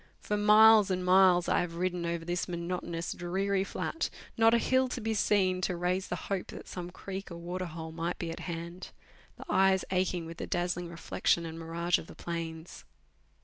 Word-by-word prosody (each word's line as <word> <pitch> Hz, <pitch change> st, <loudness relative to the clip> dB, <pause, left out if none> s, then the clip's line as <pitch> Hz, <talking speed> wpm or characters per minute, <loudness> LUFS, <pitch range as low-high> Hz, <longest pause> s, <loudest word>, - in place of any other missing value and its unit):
For 210 Hz, -, -2 dB
miles 210 Hz, 0 st, +7 dB
and 185 Hz, -1 st, -1 dB
miles 180 Hz, -1 st, +5 dB
I -, -, +3 dB
have 170 Hz, -1 st, -4 dB
ridden 180 Hz, -1 st, -1 dB
over 170 Hz, -1 st, -3 dB
this 175 Hz, +1 st, -2 dB
monotonous, 170 Hz, -1 st, -3 dB
dreary 190 Hz, +2 st, -1 dB
flat, 325 Hz, +10 st, -3 dB, 0.3 s
not 225 Hz, 0 st, +5 dB
a -, -, +5 dB
hill 260 Hz, +2 st, +2 dB
to 250 Hz, -, -4 dB
be 225 Hz, -1 st, -1 dB
seen 190 Hz, -3 st, +2 dB
to 185 Hz, -1 st, 0 dB
raise 180 Hz, +2 st, -1 dB
the -, -, -2 dB, 0.2 s
hope 195 Hz, -2 st, -1 dB
that -, -, -9 dB
some 175 Hz, -1 st, -6 dB
creek 195 Hz, +2 st, -7 dB
or 170 Hz, -, -7 dB
water 180 Hz, +2 st, -4 dB
hole 160 Hz, 0 st, -7 dB
might 165 Hz, +2 st, -3 dB
be 170 Hz, -1 st, -4 dB
at -, -, -7 dB
hand; 170 Hz, +1 st, -6 dB, 0.4 s
the -, -, -10 dB
eyes 190 Hz, 0 st, +3 dB
aching 180 Hz, -2 st, 0 dB
with 165 Hz, 0 st, -8 dB
the -, -, -5 dB
dazzling 175 Hz, 0 st, -1 dB
reflec 170 Hz, -1 st, -7 dB
tion 170 Hz, -, +4 dB
and 165 Hz, 0 st, -7 dB
mirage 165 Hz, +1 st, 0 dB
of -, -, -10 dB
the -, -, -12 dB
plains. 165 Hz, -1 st, -6 dB
180 Hz, 200 wpm, -30 LUFS, 170-190 Hz, 0.4 s, miles